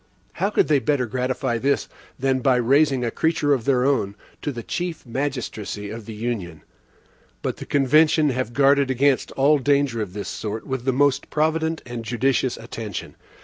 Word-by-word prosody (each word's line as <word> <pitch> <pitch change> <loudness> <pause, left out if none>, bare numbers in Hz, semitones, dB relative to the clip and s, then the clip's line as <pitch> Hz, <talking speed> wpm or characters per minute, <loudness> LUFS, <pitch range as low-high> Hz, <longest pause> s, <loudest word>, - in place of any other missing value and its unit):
How 195 +4 0
could 210 - +2
they 150 -2 +4
better 140 -2 +1
gratify 125 0 -1
this, 140 +4 +1 0.3
than 130 0 +1
by 130 0 +3
raising 135 +1 +3
a 115 - -1
creature 160 -3 +1
of 125 -5 -1
their 130 -2 +2
own 115 -8 +1 0.3
to 145 - -2
the 120 -3 -7
chief 175 +4 -4
magistracy 115 -6 -4
of 110 -1 -8
the 110 - -7
Union? 105 -9 -4 0.8
But - - -2
the - - -8
convention 150 +2 +4
have 125 -2 -2
guarded 140 0 +4
against 130 +1 +2
all 145 +2 +4
danger 140 -4 +1
of 95 -4 -5
this 105 0 -5
sort, 110 0 -5
with 130 -2 -4
the 135 - +3
most 140 +1 +1
provident 160 +1 0
and 120 -2 -6
judicious 125 +2 0
attention. 115 -2 -7
130 Hz, 175 wpm, -23 LUFS, 115-145 Hz, 0.8 s, they